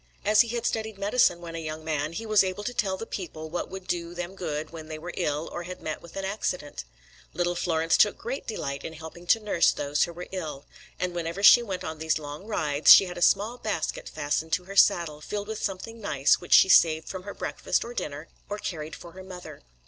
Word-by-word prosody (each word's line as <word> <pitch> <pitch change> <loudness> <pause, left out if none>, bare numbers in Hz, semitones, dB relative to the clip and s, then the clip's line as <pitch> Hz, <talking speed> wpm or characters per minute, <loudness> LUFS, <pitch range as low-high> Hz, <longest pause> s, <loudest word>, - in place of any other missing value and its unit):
As 210 +1 +6
he 235 - +1
had 235 0 -3
studied 220 -2 -2
medicine 200 -3 +2
when 170 -1 -8
a 165 - -4
young 155 0 -6
man, 155 0 -1
he 225 +6 -5
was 215 -2 +5
able 190 +2 -3
to 245 - -3
tell 195 -5 0
the 225 - -6
people 160 -6 -6
what 175 - -3
would 190 0 -8
do 170 -1 -3
them 175 +1 -5
good 155 -5 -4
when 160 -2 -9
they 155 -1 -6
were 170 +3 -7
ill 150 +2 -1
or - - -5
had 180 +1 -7
met 155 - -5
with 170 - -14
an 195 0 -3
accident. 180 - -3 0.5
Little 175 0 0
Florence 165 -2 +1
took 210 - +4
great 250 +5 -5
delight 140 -10 -4
in 160 - -6
helping 160 +2 -10
to 225 - +5
nurse 205 -6 +3
those 145 +1 0
who 170 - -9
were 175 +1 -8
ill; 155 -7 -5 0.3
and 180 -1 -1
whenever 170 +3 -4
she 240 - +9
went 195 -6 -4
on 160 -1 -5
these 160 0 +1
long 150 +5 -8
rides, 150 -8 +3
she 195 - +10
had 180 -1 -7
a - - -9
small 210 +7 +3
basket 200 -7 -3
fastened 155 +2 -2
to 180 - +1
her 195 +2 -9
saddle, 165 -5 +4
filled 205 +6 -4
with 220 -1 -5
something 220 +4 -4
nice 140 -8 +2
which 175 - -1
she - - +8
saved 160 -3 +5
from 185 - -5
her 200 +2 -8
breakfast - - -1
or 240 - -7
dinner, 150 -6 -5 0.2
or 205 - -3
carried 155 -6 -5
for 170 - -11
her 190 - -11
mother. 185 -1 -10
175 Hz, 235 wpm, -27 LUFS, 160-200 Hz, 0.5 s, she